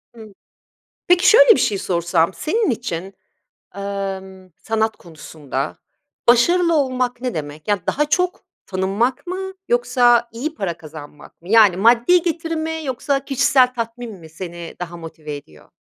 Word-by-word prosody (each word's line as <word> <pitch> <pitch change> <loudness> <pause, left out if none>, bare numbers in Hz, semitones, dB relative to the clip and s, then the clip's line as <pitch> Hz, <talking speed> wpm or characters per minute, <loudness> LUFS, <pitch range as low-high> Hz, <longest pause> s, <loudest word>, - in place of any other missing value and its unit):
Hıı. 220 -2 -12 0.8
Peki, 355 0 +5
şöyle, - - +7
bir - - 0
şey 200 -3 +1
sorsam, 170 -1 0
senin 415 - 0
için, 195 -5 -4 0.6
emm, 190 -1 -6
sanat 220 0 -1
konusunda 155 -4 -6 0.5
başarılı 335 +8 +4
olmak 255 -4 0
ne 250 -5 -3
demek? 150 +2 -7
Ya, 205 -2 +1
daha 295 - +1
çok 360 +4 -1 0.2
tanınmak 195 - -1
mı 380 +1 -4 0.2
yoksa 245 - +3
iyi 295 +7 -4
para 175 - -3
kazanmak 150 0 -13
mı? 175 - -13
Yani, 210 -5 +6
maddi 240 - +4
getiri 330 -1 -2
mi 320 0 -3
yoksa 275 +1 -1
kişisel 255 -1 +3
tatmin 230 0 -5
mi 160 - -13
seni 170 0 -8
daha 175 -1 -6
motive 155 -3 -8
ediyor? 80 - -15
225 Hz, 140 wpm, -20 LUFS, 175-275 Hz, 0.8 s, şöyle